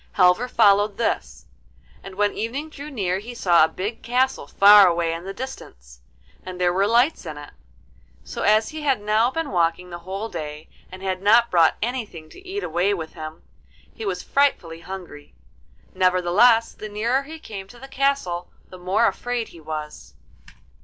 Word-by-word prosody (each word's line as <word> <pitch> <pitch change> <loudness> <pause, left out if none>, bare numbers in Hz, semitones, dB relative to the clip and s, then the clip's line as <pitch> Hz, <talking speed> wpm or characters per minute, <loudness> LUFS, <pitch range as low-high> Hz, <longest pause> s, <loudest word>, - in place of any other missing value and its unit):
Halvor 185 +5 +3
followed 205 -3 +3
this, 235 - -2 0.6
and 195 -1 -10
when 205 +1 +1
evening 275 +8 -4
drew 290 0 -9
near 190 -9 -2
he 240 +4 -9
saw 175 -7 +4
a - - +4
big 205 +7 -5
castle 255 - 0
far 200 +3 +7
away 170 -1 0
in 165 +2 -7
the 195 - -5
distance, - - -10 0.4
and 180 -1 -8
there 175 -1 +2
were 195 +2 +2
lights 240 +8 +2
in 150 - -7
it. 145 0 -10 0.7
So - - -7
as 215 +1 +3
he 310 0 -7
had 275 -5 +1
now 215 +3 +2
been 325 +3 -4
walking 175 0 0
the 175 - -7
whole 190 +5 -5
day 155 -5 -7 0.2
and 185 +1 -10
had 185 -1 -2
not 230 +4 +4
brought 165 -3 +4
anything 220 -10 -5
to - - -14
eat 385 +2 -5
away 180 +5 0
with 160 -3 -7
him, 155 +1 -9 0.5
he 450 - -9
was 405 - -3
frightfully 190 -13 0
hungry. 175 - -10 0.6
Nevertheless, 185 +6 +3
the 215 - -8
nearer 230 +6 0
he 310 +4 -10
came 200 -10 -9
to 240 - -15
the 265 +3 -11
castle 270 -11 -1 0.2
the 185 - -12
more 190 +6 +1
afraid 245 0 -2
he 170 - -14
was. 150 - -8
200 Hz, 175 wpm, -23 LUFS, 175-240 Hz, 0.7 s, far